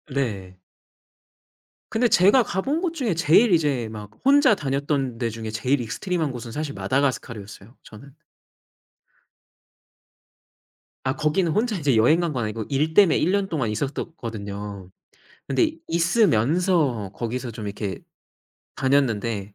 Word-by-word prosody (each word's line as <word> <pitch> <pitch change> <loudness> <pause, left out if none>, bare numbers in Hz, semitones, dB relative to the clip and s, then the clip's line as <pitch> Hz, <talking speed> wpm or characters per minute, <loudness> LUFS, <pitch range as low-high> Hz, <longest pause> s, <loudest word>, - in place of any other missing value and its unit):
네. 100 -9 -3 1.3
근데 230 +2 +2
제가 205 +6 +5
가본 270 - -2
곳 345 -3 -1
중에 240 - -1
제일 170 +8 +4
이제 140 -9 +1
막 105 -1 -9
혼자 275 -4 +5
다녔던 140 -4 -2
데 115 -2 -1
중에 110 0 -6
제일 125 +4 0
익스트림한 155 - -2
곳은 120 -2 -7
사실 150 0 -4
마다가스카르였어요 115 -5 -3
저는. 130 +6 -14 2.9
아 130 +2 -1
거기는 160 +3 +1
혼자 220 +3 0
이제 140 -6 +1
여행 140 +10 +4
간 170 -3 -1
건 120 -3 -2
아니고 110 0 -4
일 150 +3 0
때문에 195 -3 +5
1 175 - +1
년 200 -1 +1
동안 135 -10 -1
있었었거든요. 105 - -5 0.6
근데 325 -3 +2 0.2
있으면서 165 - +2
거기서 120 +1 -4
좀 110 -1 -7
이렇게 100 -2 -4 0.8
다녔는데 115 -6 +1
135 Hz, 275 characters per minute, -23 LUFS, 110-175 Hz, 2.9 s, 제가